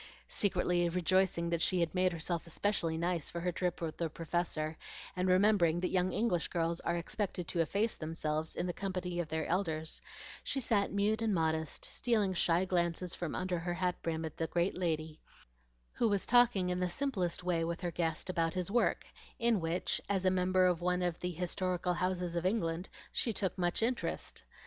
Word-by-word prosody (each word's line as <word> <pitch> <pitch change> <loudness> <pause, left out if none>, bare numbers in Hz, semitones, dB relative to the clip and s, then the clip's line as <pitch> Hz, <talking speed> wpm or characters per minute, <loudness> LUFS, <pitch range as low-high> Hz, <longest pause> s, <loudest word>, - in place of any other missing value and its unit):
Secretly 180 -3 +2
rejoicing 180 -1 +2
that 170 -1 +1
she 180 +2 +3
had 170 -2 +1
made 185 0 +3
herself 170 0 -2
especially 170 -2 0
nice 170 -2 -1
for 170 - -4
her 180 +1 0
trip 180 0 -1
with 160 -2 -3
the 165 -1 -1
Professor, 160 -1 -2 0.4
and 180 0 0
remembering 185 -3 +4
that 180 - -1
young 185 0 +2
English 195 -7 +1
girls 170 0 -1
are 175 - -1
expected 180 0 -3
to 175 - -2
efface 200 +7 +1
themselves 155 -1 -2
in - - -1
the 175 - -2
company 180 -2 -3
of 175 - -1
their 160 0 -1
elders, 160 -4 -1 0.4
she 275 - 0
sat 220 -5 +1
mute 205 +2 +1
and 220 -3 +1
modest, 160 -2 -1
stealing 215 -6 +1
shy 175 0 +2
glances 175 -1 0
from 175 -4 -3
under 185 -1 -1
her 175 +1 -2
hat 180 0 +1
brim 160 -1 -2
at 160 - -7
the 165 - -1
great 175 +3 0
lady, 160 -3 -2 0.7
who 235 - +2
was 200 -2 +1
talking 240 -7 +4
in 180 0 0
the 180 0 0
simplest 185 -7 -1
way 175 -2 +1
with 170 +2 -3
her 175 -2 -2
guest 165 -2 -1
about 165 -2 0
his 185 +1 -2
work, 240 +2 +2 0.3
in 235 -4 +2
which, 165 +2 0
as 195 -2 +1
a 185 - +5
member 185 0 +3
of 175 -2 +2
one 180 0 +1
of 175 -2 -1
the 180 - -2
historical 180 +1 -1
houses 180 -1 -1
of 170 - 0
England, 180 -3 0 0.2
she 235 - +1
took 195 -3 -1
much 175 +3 0
interest. 245 +2 -2
180 Hz, 190 wpm, -33 LUFS, 165-185 Hz, 0.7 s, a